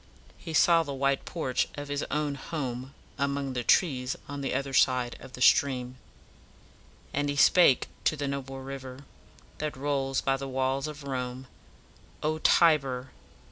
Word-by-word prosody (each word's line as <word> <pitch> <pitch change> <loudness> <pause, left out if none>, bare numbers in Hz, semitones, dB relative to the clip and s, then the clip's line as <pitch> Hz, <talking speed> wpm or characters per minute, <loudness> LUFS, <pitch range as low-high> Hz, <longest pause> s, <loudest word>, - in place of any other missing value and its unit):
He 160 - -6
saw 170 +1 +5
the 145 -4 -4
white 140 0 0
porch 135 -8 -1
of 145 0 -6
his 145 0 -2
own 150 -1 -1
home 135 -3 -5 0.2
among 140 -1 -1
the 125 -1 -2
trees 130 -4 +2
on 145 0 -6
the 135 - -2
other 135 +1 -2
side 125 -2 +3
of 130 - -12
the 125 - -2
stream; 130 -2 +3 1.2
"And 145 +1 0
he 145 - -1
spake 145 -2 +5 0.2
to 155 - +2
the 140 -1 -2
noble 135 -1 -5
river 130 -1 -8 0.6
That 150 -2 -3
rolls 135 -1 -1
by 135 0 +1
the 135 0 -5
walls 130 +2 -1
of 150 -1 -8
Rome: 130 -1 -4 0.8
'O 155 +1 0
Tiber! 135 -7 +3
135 Hz, 155 wpm, -28 LUFS, 130-145 Hz, 1.2 s, saw